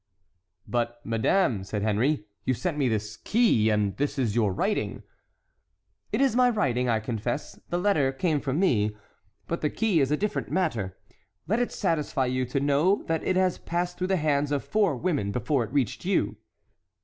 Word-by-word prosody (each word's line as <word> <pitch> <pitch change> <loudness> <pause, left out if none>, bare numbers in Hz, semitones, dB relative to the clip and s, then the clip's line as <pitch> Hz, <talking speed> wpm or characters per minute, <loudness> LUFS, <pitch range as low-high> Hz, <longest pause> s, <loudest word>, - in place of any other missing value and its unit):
"But, 120 0 -1
madame," 115 - +1
said 100 +1 -3
Henry, 110 +4 +1 0.2
"you 130 - +1
sent 175 +4 -2
me 140 -4 +1
this 110 0 -2
key, 205 - +3
and 105 -3 +1
this 145 +1 -1
is 120 -6 0
your 110 -4 +2
writing." 200 - -1 1.1
"It - - 0
is 270 -4 +3
my 250 0 +5
writing, 125 - +1
I 115 -2 +2
confess; 115 +4 -4
the 175 - 0
letter 175 -8 +2
came 150 +2 0
from 140 +2 -1
me, 105 - +2 0.5
but 170 - -3
the 150 - +1
key 215 -4 +1
is 135 - +2
a 150 - +2
different 210 +4 -2
matter. 120 - -1 0.5
Let 220 +7 +1
it 245 - 0
satisfy 155 -7 0
you 130 0 0
to 125 +3 -1
know 145 +8 +2
that 165 -1 -1
it 185 - +1
has 185 -1 +2
passed 175 +1 -3
through 185 - 0
the 190 - +2
hands 145 -2 +1
of 145 -2 0
four 205 -8 +1
women 140 - -1
before 125 +3 0
it - - -12
reached 135 -5 0
you." - - +1
140 Hz, 185 wpm, -27 LUFS, 115-180 Hz, 1.1 s, my